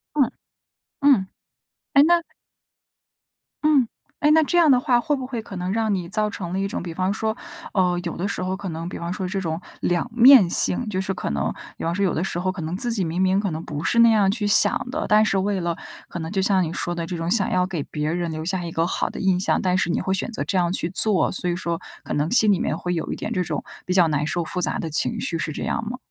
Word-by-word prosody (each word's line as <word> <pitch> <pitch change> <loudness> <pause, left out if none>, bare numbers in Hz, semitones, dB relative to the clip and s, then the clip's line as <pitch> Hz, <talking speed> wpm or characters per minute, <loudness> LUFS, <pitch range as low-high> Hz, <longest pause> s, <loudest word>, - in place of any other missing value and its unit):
嗯， 280 -5 +2 0.7
嗯， 270 -9 +4 0.7
诶， 280 - +7
那 340 +2 +4 1.4
嗯。 290 -6 +3 0.3
诶， 300 - +2
那 320 0 +5
这 350 - -2
样 320 -3 +5
的 255 -2 +5
话 250 -3 +2
会 295 +4 0
不 265 -2 -5
会 250 -3 -5
可 200 -3 -10
能 180 +2 -3
让 220 -3 0
你 175 -2 -4
造 210 +2 +1
成 175 -4 -6
了 190 - -1
一 195 - -1
种， 195 - -5
比 170 -2 -6
方 185 +3 -1
说， 220 +1 -2 0.4
呃， 180 -3 +1
有 170 - -4
的 185 - -3
时 200 -2 -3
候 185 +1 -2
可 195 -1 -6
能 165 +1 -5
比 - - -7
方 170 +1 -4
说， 185 0 -4
这 195 +1 -3
种 160 -2 -3 0.2
两 175 +5 -1
面 245 -5 +8
性。 215 +6 +4
就 190 -2 -2
是 190 0 -2
可 180 - -4
能 70 -1 -1 0.2
比 - - -9
方 165 +1 -1
说， 200 0 +1
有 180 - 0
的 165 - -1
时 175 - -3
候 185 +1 -1
可 185 -2 -7
能 160 +3 -4
自 240 +3 +3
己 200 - +1
明 165 +2 -3
明 190 +1 +2
可 200 -2 -1
能 160 0 -5
不 150 0 -5
是 235 - 0
那 235 0 +7
样 205 -3 +3
去 210 0 -1
想 205 +4 +5
的， 310 +3 -3
但 215 +1 +5
是 195 -2 +1
为 195 0 -1
了 170 -1 -2 0.3
可 175 - -7
能 160 +2 -5
就 195 - -1
像 190 -1 +2
你 165 - -3
说 175 0 -3
的 170 -1 -4
这 175 -1 -4
种 165 +2 -3
想 205 -4 +3
要 180 0 +1
给 180 -5 -4
别 150 +2 -3
人 175 -1 -2
留 155 0 -5
下 185 0 -1
一 170 - -5
个 165 +1 0
好 - - -1
的 - - -8
印 190 -2 +1
象， 190 - +1
但 180 -1 0
是 190 -2 0
你 - - 0
会 190 - -1
选 195 +5 +1
择 - - -4
这 195 - -3
样 175 -1 +1
去 175 - -1
做， 205 0 +3
所 180 -1 -3
以 175 - -1
说 170 -2 -3 0.2
可 - - -5
能 150 +3 0
心 220 -4 +6
里 190 - +1
面 - - -2
会 180 0 -3
有 165 - -3
一 - - -3
点 - - -5
这 180 - 0
种 155 -3 -4 0.2
比 180 - 0
较 180 -3 +5
难 150 -1 -1
受 170 +2 -1
复 180 +3 -4
杂 - - 0
的 160 - -5
情 150 - +1
绪， 165 - -2
是 165 - -3
这 - - -6
样 - - -2
吗？ 250 - -5
185 Hz, 300 characters per minute, -22 LUFS, 170-215 Hz, 1.4 s, 面